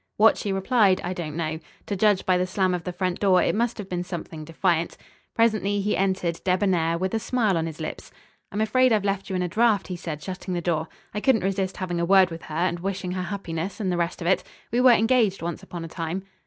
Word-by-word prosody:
What 220 Hz, +1 st, +6 dB
she 205 Hz, -, -3 dB
replied 195 Hz, 0 st, +3 dB
I 180 Hz, -, -2 dB
don't 160 Hz, -4 st, -5 dB
know. 160 Hz, -1 st, -2 dB, 0.3 s
To 205 Hz, -, -2 dB
judge 205 Hz, -1 st, +2 dB
by 185 Hz, -, +3 dB
the 180 Hz, 0 st, +1 dB
slam 185 Hz, 0 st, +1 dB
of 175 Hz, -2 st, -3 dB
the 180 Hz, -, -2 dB
front 180 Hz, 0 st, -2 dB
door 190 Hz, -3 st, +4 dB
it -, -, +1 dB
must 235 Hz, +2 st, 0 dB
have 205 Hz, -3 st, -6 dB
been 180 Hz, -2 st, -3 dB
something 170 Hz, -3 st, -6 dB
defiant. 165 Hz, +1 st, 0 dB, 0.4 s
Presently 215 Hz, -3 st, +2 dB
he 205 Hz, +1 st, 0 dB
entered 185 Hz, -3 st, 0 dB
debonair, 180 Hz, -3 st, +1 dB
with 185 Hz, +3 st, -2 dB
a 225 Hz, -, +1 dB
smile 220 Hz, -4 st, +1 dB
on 165 Hz, 0 st, 0 dB
his 160 Hz, -1 st, -8 dB
lips. 155 Hz, -, -6 dB, 0.4 s
"I'm 205 Hz, -, -2 dB
afraid 255 Hz, +4 st, +3 dB
I've 210 Hz, -2 st, +2 dB
left 195 Hz, -1 st, -1 dB
you 190 Hz, -, -2 dB
in 180 Hz, -, 0 dB
a -, -, 0 dB
draught," 215 Hz, +2 st, +2 dB
he 180 Hz, -, -3 dB
said, 155 Hz, -3 st, -6 dB
shutting 185 Hz, -1 st, -5 dB
the -, -, 0 dB
door. 165 Hz, -1 st, -1 dB, 0.3 s
"I 210 Hz, -, -3 dB
couldn't 260 Hz, -5 st, +3 dB
resist 195 Hz, 0 st, -1 dB
having 175 Hz, -2 st, -2 dB
a 170 Hz, -, +1 dB
word 190 Hz, -1 st, +5 dB
with 165 Hz, 0 st, -7 dB
her 155 Hz, -, -7 dB
and 170 Hz, +1 st, 0 dB
wishing 190 Hz, 0 st, -3 dB
her 185 Hz, 0 st, -2 dB
happiness 180 Hz, -1 st, -4 dB
and 190 Hz, -4 st, -1 dB
the -, -, 0 dB
rest 170 Hz, +1 st, -2 dB
of 170 Hz, -, -2 dB
it. 190 Hz, -, +3 dB, 0.3 s
We 240 Hz, +2 st, +2 dB
were 255 Hz, -, +7 dB
engaged 225 Hz, -4 st, +2 dB
once 170 Hz, -1 st, -4 dB
upon 170 Hz, -2 st, -7 dB
a -, -, -6 dB
time." 165 Hz, +3 st, -4 dB
185 Hz, 250 wpm, -25 LUFS, 170-205 Hz, 0.4 s, were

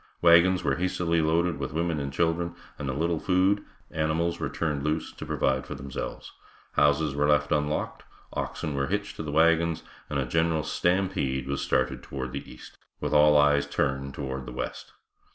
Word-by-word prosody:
Wagons 85 Hz, +2 st, +5 dB
were -, -, +1 dB
hastily 85 Hz, -2 st, +1 dB
loaded 80 Hz, 0 st, +1 dB
with 70 Hz, 0 st, -4 dB
women 85 Hz, -1 st, 0 dB
and 70 Hz, -1 st, -3 dB
children, 85 Hz, +3 st, 0 dB, 0.2 s
and 70 Hz, -2 st, -3 dB
a -, -, +1 dB
little 80 Hz, +3 st, 0 dB
food, 95 Hz, +4 st, +2 dB, 0.3 s
animals 80 Hz, +2 st, 0 dB
were -, -, -2 dB
turned 75 Hz, -4 st, -2 dB
loose 75 Hz, +2 st, -1 dB
to -, -, -9 dB
provide 65 Hz, -1 st, 0 dB
for -, -, -5 dB
themselves; 65 Hz, 0 st, -6 dB, 0.4 s
houses 75 Hz, 0 st, +3 dB
were 75 Hz, +1 st, +1 dB
left 75 Hz, 0 st, +2 dB
unlocked, 75 Hz, 0 st, -1 dB, 0.3 s
oxen 75 Hz, -, -3 dB
were 70 Hz, 0 st, -1 dB
hitched 105 Hz, +2 st, -2 dB
to -, -, -4 dB
the 75 Hz, -2 st, -4 dB
wagons, 85 Hz, +1 st, +3 dB, 0.3 s
and 75 Hz, -, -1 dB
a 70 Hz, -, 0 dB
general 80 Hz, +3 st, +1 dB
stampede 90 Hz, -8 st, 0 dB
was 70 Hz, 0 st, -2 dB
started 65 Hz, 0 st, 0 dB
toward 65 Hz, -2 st, -5 dB
the 70 Hz, -, -7 dB
east, -, -, -13 dB, 0.2 s
with -, -, -2 dB
all 75 Hz, 0 st, +6 dB
eyes 75 Hz, -1 st, +4 dB
turned 70 Hz, -1 st, -1 dB
toward 65 Hz, -2 st, -5 dB
the -, -, -6 dB
west. -, -, -5 dB
75 Hz, 180 wpm, -27 LUFS, 70-85 Hz, 0.4 s, all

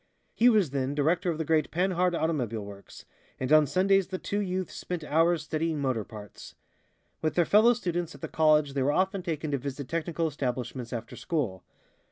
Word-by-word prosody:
He 240 Hz, +2 st, +5 dB
was 205 Hz, -, +3 dB
then 135 Hz, 0 st, -1 dB
director 165 Hz, +5 st, +1 dB
of 165 Hz, -, -1 dB
the 160 Hz, -, -2 dB
great 155 Hz, -1 st, +2 dB
Panhard 180 Hz, 0 st, +1 dB
automobile 125 Hz, -11 st, -1 dB
works, 100 Hz, -1 st, -12 dB, 0.3 s
and 130 Hz, +4 st, 0 dB
on 155 Hz, -1 st, +6 dB
Sundays 190 Hz, +5 st, +3 dB
the 190 Hz, -, -4 dB
two 205 Hz, +2 st, -3 dB
youths 185 Hz, -2 st, -2 dB
spent 175 Hz, -3 st, -5 dB
hours 165 Hz, +2 st, +2 dB
studying 155 Hz, 0 st, -2 dB
motor 130 Hz, -6 st, 0 dB
parts. 105 Hz, -1 st, -11 dB, 0.7 s
With 155 Hz, -, -1 dB
their 175 Hz, -, +3 dB
fellow 220 Hz, +7 st, +6 dB
students 175 Hz, -6 st, -3 dB
at -, -, -14 dB
the -, -, -4 dB
college 155 Hz, -2 st, +3 dB
they 135 Hz, -, -1 dB
were 135 Hz, +2 st, +2 dB
often 190 Hz, +2 st, +1 dB
taken 155 Hz, -3 st, -3 dB
to 140 Hz, -, 0 dB
visit 140 Hz, +1 st, -5 dB
technical 165 Hz, 0 st, -1 dB
establishments 125 Hz, -4 st, -4 dB
after 115 Hz, -2 st, -6 dB
school. 125 Hz, -, -3 dB
155 Hz, 190 wpm, -28 LUFS, 135-180 Hz, 0.7 s, on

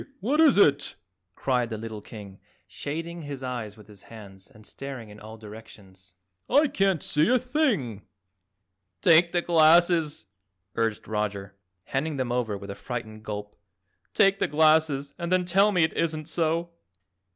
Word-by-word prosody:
What 285 Hz, +9 st, +1 dB
is 305 Hz, -8 st, +5 dB
it?" 145 Hz, -7 st, +3 dB, 0.4 s
cried 125 Hz, -3 st, 0 dB
the 110 Hz, -, -4 dB
little 110 Hz, -1 st, -7 dB
King, 100 Hz, -3 st, -11 dB, 0.3 s
shading 165 Hz, +4 st, -6 dB
his 140 Hz, -3 st, -7 dB
eyes 120 Hz, -5 st, -5 dB
with 105 Hz, -, -15 dB
his 105 Hz, -3 st, -15 dB
hands 100 Hz, -4 st, -13 dB
and 110 Hz, 0 st, -18 dB
staring 135 Hz, -5 st, -8 dB
in 105 Hz, 0 st, -13 dB
all 110 Hz, +1 st, -11 dB
directions. 100 Hz, -4 st, -14 dB, 0.3 s
"I 290 Hz, +3 st, +4 dB
can't 195 Hz, -, +1 dB
see 155 Hz, +6 st, +1 dB
a 255 Hz, -, +5 dB
thing." 245 Hz, -, -1 dB, 1.0 s
"Take 170 Hz, +1 st, +5 dB
the 175 Hz, -1 st, 0 dB
glasses," 165 Hz, -3 st, +3 dB, 0.5 s
urged 115 Hz, -2 st, -2 dB
Roger, 105 Hz, -2 st, -3 dB, 0.3 s
handing 145 Hz, +6 st, -3 dB
them 130 Hz, -2 st, -2 dB
over 120 Hz, -4 st, -1 dB
with 100 Hz, 0 st, -8 dB
a -, -, -5 dB
frightened 110 Hz, -3 st, -7 dB
gulp. 105 Hz, -1 st, -7 dB, 0.6 s
"Take 195 Hz, 0 st, +4 dB
the -, -, +1 dB
glasses 155 Hz, -2 st, +2 dB
and 170 Hz, 0 st, -4 dB
then 185 Hz, -1 st, +2 dB
tell 195 Hz, +4 st, +3 dB
me 180 Hz, -4 st, +3 dB
it 160 Hz, -, 0 dB
isn't 155 Hz, -2 st, -2 dB
so." 165 Hz, +1 st, -1 dB
140 Hz, 155 wpm, -26 LUFS, 110-170 Hz, 1.0 s, is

